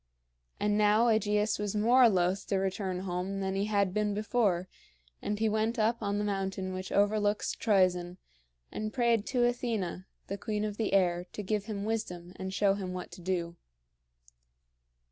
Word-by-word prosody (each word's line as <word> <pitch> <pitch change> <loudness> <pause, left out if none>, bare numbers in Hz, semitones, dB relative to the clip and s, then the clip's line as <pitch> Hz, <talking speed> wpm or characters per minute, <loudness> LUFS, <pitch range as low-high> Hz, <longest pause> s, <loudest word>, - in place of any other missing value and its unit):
And 210 0 +1
now 210 +3 +4
AEgeus 210 -1 +1
was 210 0 -2
more 240 +3 +6
loth 185 0 +1
to 200 - 0
return 190 -1 -2
home 185 +1 -3
than 190 -1 -1
he 195 +1 0
had 200 -3 +1
been 210 -1 0
before, 205 -4 +1 0.5
and 210 - -2
he 220 +1 +1
went 220 +3 0
up 225 +2 +1
on 205 -1 -1
the 210 - 0
mountain 195 -2 -2
which 185 0 -5
overlooks 205 +1 +1
Troezen, 185 -4 +2 0.5
and 215 0 -4
prayed 235 -4 +2
to 245 -2 +2
Athena, 225 -7 -2 0.2
the 200 +1 -5
queen 215 -1 -2
of 210 -1 -4
the 220 -3 -1
air, 180 -2 +2
to 210 - -5
give 205 +1 -1
him 205 -2 -4
wisdom 180 -6 -3
and 190 0 -4
show 195 +1 +3
him 190 -2 -4
what 180 - -6
to - - -11
do. 170 -1 -2
205 Hz, 170 wpm, -30 LUFS, 185-215 Hz, 0.5 s, more